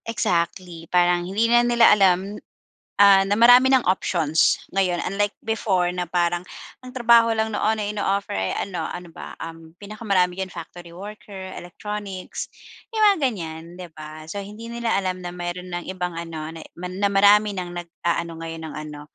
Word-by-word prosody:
Exactly 170 -4 -2
parang 175 0 +2
hindi 210 +4 +1
na 240 +1 +5
nila 240 -1 +5
alam, 195 -1 +3 0.7
ah, 200 -1 +8
na 200 +1 +1
marami 245 +3 +7
ng 260 - +4
options 165 -4 +2 0.2
ngayon 185 -2 +1
unlike 205 +2 -1
before 195 -5 +1
na 180 0 -2
parang 175 0 +1 0.4
ang - - -8
trabaho 235 -2 +5
lang 220 0 -1
noon 220 +1 +1
na 210 - -2
ino-offer 200 -1 -1
ay 95 0 -1
ano 180 -4 -5
ano 175 -1 -8
ba, 175 - -9
um, 165 0 -10
pinaka-marami 200 -4 0
diyan 190 - -4
factory 170 +1 -10
worker, 195 -1 -9
electronics, 195 +1 -6 0.4
yung 435 -1 +1
mga - - -6
ganyan 165 -7 -7
'di 180 -1 -8
ba, 155 0 -9
so 200 - -4
hindi 210 +3 -9
nila 235 -1 -2
alam 185 -1 -2
na 175 - -5
meron 180 +1 -5
ng 175 0 -4
ibang 180 -1 -3
ano, 165 -2 -6
na 180 +4 -4
marami 205 +1 +5
ng 180 -2 -4
nag-aano 170 -1 -3
ngayon 165 0 -6
ng 155 - -8
ano, 150 -1 -7
185 Hz, 165 wpm, -23 LUFS, 175-210 Hz, 0.7 s, ah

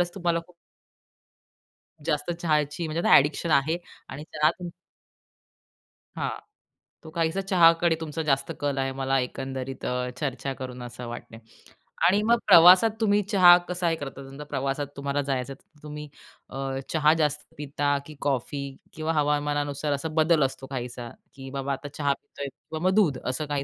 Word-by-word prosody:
खरंच 175 0 +1
तुम्हाला 175 -3 0
खूप 180 - -22 1.5
जास्त 150 +1 -1
चहाची 155 -1 -1
म्हणजे 155 +2 -3
आता - - +9
एडिक्शन 150 +4 +1
आहे 155 +4 +3 0.3
आणि 140 +3 -7
चहा 150 +1 +4
तुम 175 -1 -5 1.5
हां. - - -1 0.7
तो 160 - -10
काहीसा 165 +3 0
चहाकडे 170 -3 +4
तुमचा 160 0 -4
जास्त 135 -3 0
कल 145 -1 -1
आहे 135 0 0
मला 135 0 +1
एकंदरीत 130 +1 -5
अ, 125 0 -1
चर्चा 135 -1 -3
करून 125 -1 -6
असं 120 0 -8
वाटतंय 120 -1 -8 0.7
आणि 200 +4 +3
मग 235 +1 +4
प्रवासात 185 +3 +8
तुम्ही 205 -1 +3
चहा 185 -3 +7
कसा 180 -1 -1
हे 165 - +1
करता? 140 -2 -7
तुमचा 135 +2 -9
प्रवासात 140 0 -2
तुम्हाला 140 0 -1
जायचं 135 -1 -2
आहे. 135 - -18
तर 155 - -29
तुम्ही 150 0 -7 0.4
अ, 135 - -8 0.3
चहा 155 -1 +4
जास्त 150 0 -1
पिता 145 0 -1
की 155 - -11
कॉफी 140 0 -1 0.3
किंवा 160 +1 -2
हवामानानुसार 145 -1 0
असा 140 +3 -3
बदल 160 -1 +4
असतो 135 0 -5
काहीसा, 125 -2 -6 0.2
की 135 -1 -9
बाबा 140 0 -2
आता 140 +2 -6
चहा 145 -2 +2
पितोय 140 0 -8
किंवा 150 +4 -9
मग 190 - 0
दूध 165 -11 +3
असं 130 +4 -2
काही 145 -1 -1
145 Hz, 165 wpm, -26 LUFS, 135-165 Hz, 1.5 s, आता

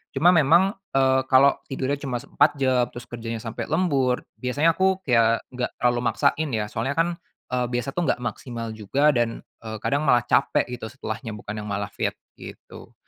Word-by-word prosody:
Cuma 175 +2 +5
memang, 170 +4 +4 0.2
eee, 130 0 +4
kalau 135 +2 +5
tidurnya 135 +1 -2
cuma 130 -4 -3
4 145 +1 +2
jam, 130 -3 +2
terus 120 - -10
kerjanya 115 -1 -6
sampai 115 -2 -5
lembur, 140 -7 +1 0.2
biasanya 145 +6 +2
aku 190 +2 +1
kayak 115 -3 +3
enggak 125 -1 -4
terlalu 120 0 +1
maksain 150 +1 +1
ya, 105 -1 -3
soalnya 140 +1 -2
kan, 165 +1 +2 0.4
eee, 125 -1 +1
biasa 120 +3 -2
tuh 175 +4 -1
enggak 125 - 0
maksimal 115 0 -5
juga 135 +8 +2
dan, 120 -3 -1 0.2
eee, 110 -1 -7
kadang 145 +2 0
malah 120 -2 +4
capek 140 +4 +2
gitu 120 -2 -5
setelahnya 115 -2 -6
bukan 105 0 -6
yang 105 - -7
malah 100 0 -3
fit - - -2 0.2
gitu. - - -12
130 Hz, 180 wpm, -24 LUFS, 115-145 Hz, 0.4 s, Cuma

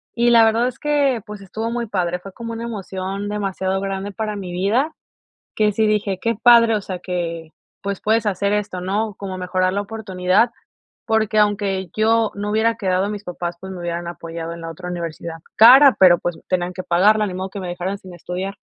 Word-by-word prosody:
y 240 0 +3
la 230 -1 +7
verdad 230 +2 +2
es 255 - -6
que, 285 -6 +1
pues, 210 -1 -8
estuvo 220 +4 -4
muy 235 0 -2
padre, 180 -4 -1
fue 190 +1 -11
como 230 -1 -6
una 230 - -5
emoción 195 -2 -4
demasiado 195 -2 -2
grande 195 +1 -3
para 215 +1 -3
mi 190 -3 -6
vida 220 - 0 0.6
que 210 -1 +3
sí 220 +1 +1
dije: 205 -3 0
"Qué 230 0 0
padre", 235 -2 +6
o 210 - -1
sea 185 -2 -6
que, 170 -3 -4 0.3
pues, 200 -1 -4
puedes 220 +1 +2
hacer 200 0 0
esto, 205 -3 -2
¿no? 205 +2 -2
Como 190 -2 -6
mejorar 185 0 0
la 200 - 0
oportunidad, 200 0 0 0.5
porque 220 -1 +1
aunque 200 -3 +1
yo 225 0 +3
no 205 +1 -3
hubiera 225 +2 +2
quedado 190 0 0
mis 210 -1 -5
papás, 175 -1 -5
pues 190 0 -8
me 180 - -8
hubieran 170 0 -4
apoyado 165 -1 -6
en 170 - -9
la 165 - -6
otra 180 +2 -8
universidad 170 -1 -5 0.2
cara, 260 +5 +9
pero, 175 -2 +7
pues 175 -2 -3
tenían 180 -1 0
que 185 0 -6
pagarla, 210 +5 +3
ni 185 - -5
modo 190 +1 -4
que 200 - -7
me 180 - -5
dejaran 180 +3 -3
sin 185 -2 -13
estudiar. 180 +3 -5
195 Hz, 205 wpm, -21 LUFS, 180-220 Hz, 0.6 s, cara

